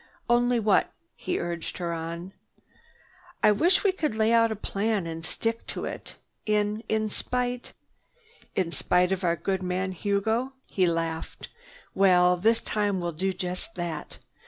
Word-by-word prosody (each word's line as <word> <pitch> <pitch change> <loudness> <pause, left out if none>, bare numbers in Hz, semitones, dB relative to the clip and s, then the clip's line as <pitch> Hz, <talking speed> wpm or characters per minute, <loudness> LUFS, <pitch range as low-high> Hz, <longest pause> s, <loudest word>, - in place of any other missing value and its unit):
"Only 240 0 +3
what?" 210 -2 +3 0.2
He 360 - -2
urged 170 -1 -4
her 170 -2 -2
on. 170 +3 -5 1.1
"I - - +7
wish 345 - +4
we 400 - +4
could 310 - -2
lay 220 +1 +3
out 230 -1 +5
a - - -1
plan 205 -1 -1
and 165 0 -5
stick 225 +7 -2
to - - -4
it, - - -7 0.3
in—in 215 +1 0
spite—" 250 +1 -2 0.8
"In 180 -3 0
spite 180 +1 +2
of 190 0 -1
our 170 -1 +2
good 190 +2 -1
man 185 +1 -1
Hugo," 215 +7 0 0.2
he 185 -2 +3
laughed. 165 -1 -3 0.4
"Well, 180 -2 +5
this 225 +6 +2
time 205 -3 0
we'll 175 -1 -2
do 190 +5 -1
just 180 +3 -5
that. 170 -4 -5
195 Hz, 150 wpm, -27 LUFS, 175-225 Hz, 1.1 s, I